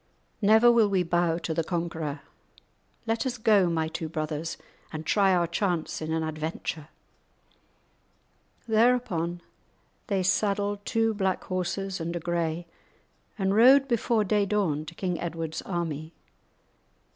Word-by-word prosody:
Never 220 +3 +6
will 230 -3 +4
we 190 -2 +2
bow 170 -1 +1
to 170 -1 -3
the 165 +1 0
conquerer. 165 -4 -3 0.8
Let 225 +3 0
us 250 -1 -3
go, 210 -5 +4
my 160 -1 0
two 160 0 -5
brothers, 155 +1 -3 0.3
and 155 0 -6
try 195 +1 +3
our 175 -2 +3
chance 170 -2 -2
in 155 0 -3
an 160 0 0
adventure?" 155 0 -4 1.8
Thereupon 220 -7 +1 0.7
they 195 -4 0
saddled 205 +1 0
two 225 -1 +1
black 190 -3 -1
horses 185 +1 -3
and 170 +1 -3
a - - -1
grey, 170 0 -2 0.7
and 195 -2 +1
rode 265 +5 +7
before 235 -2 +1
day 205 0 +1
dawn 175 -8 0
to 170 - -9
King 180 -2 -2
Edward's 165 -2 -4
army. 165 -3 -4
175 Hz, 135 wpm, -27 LUFS, 165-205 Hz, 1.8 s, rode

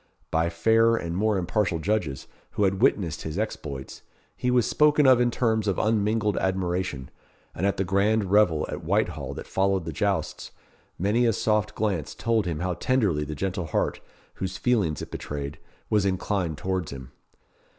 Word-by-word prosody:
By 80 +1 +2
fairer 115 +7 +3
and 85 -3 -4
more 105 +2 +1
impartial 90 -1 0
judges, 80 -6 -1 0.3
who 105 - 0
had 95 0 +1
witnessed 85 -7 +2
his 80 +2 -5
exploits, 75 -11 -5 0.3
he 125 - -1
was 125 -2 +3
spoken 150 -1 +4
of 130 -2 +6
in 120 - +3
terms 110 -3 0
of 100 - +1
unmingled 105 -1 +1
admiration; 90 -7 -2 0.4
and 95 - 0
at 100 - 0
the 95 - +1
grand 100 +1 +1
revel 100 -7 +4
at - - -5
Whitehall - - -1
that - - -7
followed 95 -2 0
the 80 - -4
jousts, - - -1 0.5
many 110 +6 +2
a 115 - +3
soft 105 0 0
glance 90 -9 -2
told 115 -4 0
him 80 -2 -3
how 90 0 0
tenderly 100 - +1
the 75 +1 -5
gentle 95 0 -2
heart, - - -1 0.3
whose 95 +1 -4
feelings 100 - +1
it - - -10
betrayed, 70 -1 -5 0.3
was 105 -2 +2
inclined 95 -4 -1
towards 95 -2 -2
him. 65 -1 -9
95 Hz, 170 wpm, -26 LUFS, 85-110 Hz, 0.5 s, of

